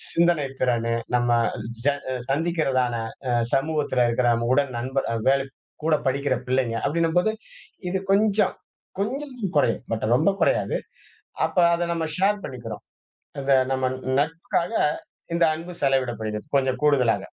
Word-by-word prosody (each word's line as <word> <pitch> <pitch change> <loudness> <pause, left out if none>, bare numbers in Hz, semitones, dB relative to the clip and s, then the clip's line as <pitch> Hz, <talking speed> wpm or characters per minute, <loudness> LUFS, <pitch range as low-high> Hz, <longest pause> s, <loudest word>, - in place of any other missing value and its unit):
சிந்தனைத் 155 -6 +2
திறனு, 115 -2 +1 0.2
நம்ம 120 0 +2 0.5
ஜ - - +6 0.4
சந்திக்கிறதான 135 -5 +1 0.4
அ - - +2 0.2
சமூகத்துல 145 -3 +1
இருக்குற 120 +1 +1
நம்ம 115 0 -1
உடன் 140 -1 +2
நண்பர் 130 +3 -2
அ - - -1
வேல் 135 0 +4 0.4
கூட 160 -1 +3
படிக்கிற 140 0 +1
பிள்ளைங்க, 125 -3 +1
அப்படீன்னும்போது, 170 +6 +2 0.6
இது 190 - 0
கொஞ்சம் 210 +1 +3 0.5
கொஞ்சமும் 250 -2 -3
குறையும். 140 - +2
பட் 110 - -2
ரொம்ப 200 - +3
குறையாது. - - +2 0.7
அப்ப - - -6 0.2
அத 170 0 0
நம்ம 165 -1 -2
ஷேர் 200 +2 +2
பண்ணிக்கிறோம். 120 -4 -7 0.6
அந்த 135 0 +1 0.2
நம்ம 130 -1 0 0.3
நட்புக்காக 165 +5 -1 0.6
இந்த 170 0 +3
அன்பு 170 +3 -7
செலவிடப்படுகிறது. 120 -5 0
கொஞ்சம் 130 0 +1
கூடுதலாக. 135 -6 +3
140 Hz, 130 wpm, -24 LUFS, 125-170 Hz, 0.7 s, ஜ